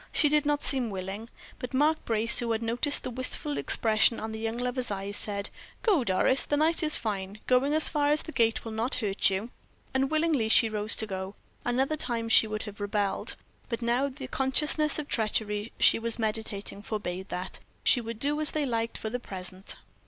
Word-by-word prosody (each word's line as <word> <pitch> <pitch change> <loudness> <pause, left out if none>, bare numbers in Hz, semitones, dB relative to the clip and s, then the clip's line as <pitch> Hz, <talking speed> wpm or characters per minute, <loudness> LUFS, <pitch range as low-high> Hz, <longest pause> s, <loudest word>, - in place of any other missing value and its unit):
She 295 - +4
did 300 0 +2
not 290 0 0
seem 260 -4 -1
willing, 195 +3 -6 0.3
but 250 +1 -5
Mark 305 +3 +2
Brace, 225 +1 +6
who 235 -1 -1
had 225 +1 -2
noticed 245 +6 +1
the - - -4
wistful 255 +4 -1
expression 220 +1 +3
of 220 - -5
the 220 - -6
young 225 +1 -3
lover's 250 0 -2
eyes, 200 0 -4
said: 200 -1 -2 0.3
"Go, 385 - +3
Doris; 235 +6 +1
the 290 - -1
night 320 +3 +2
is 305 -1 0
fine; 200 -2 -4
going 265 +4 +2
as 315 - +8
far 290 -2 +1
as 300 +1 +2
the 320 - -8
gate 230 -5 +1
will 225 - -5
not 225 +4 -2
hurt 205 -5 +1
you." 200 +5 -3 0.4
Unwillingly 275 -2 +1
she 225 0 +5
rose 215 0 +3
to 220 - -1
go. 190 -1 -6 0.3
Another 265 +5 0
time 230 -6 -1
she 225 - +6
would 215 0 -4
have 210 -1 -9
rebelled, 205 -1 -1 0.3
but 235 -1 -3
now 245 +4 +1
the 265 0 -8
consciousness 295 +4 +1
of 300 - -3
the - - -19
treachery 215 -1 -1
she - - +5
was 230 0 +1
meditating 215 -3 -2
forbade 190 -3 -5
that; 180 +1 -5 0.2
she 245 - +4
would 230 -1 -6
do 290 +5 0
as 305 - +3
they 305 -2 0
liked 230 -2 -2
for 220 - -5
the 245 - -3
present. 185 -3 -5
230 Hz, 205 wpm, -28 LUFS, 210-275 Hz, 0.4 s, as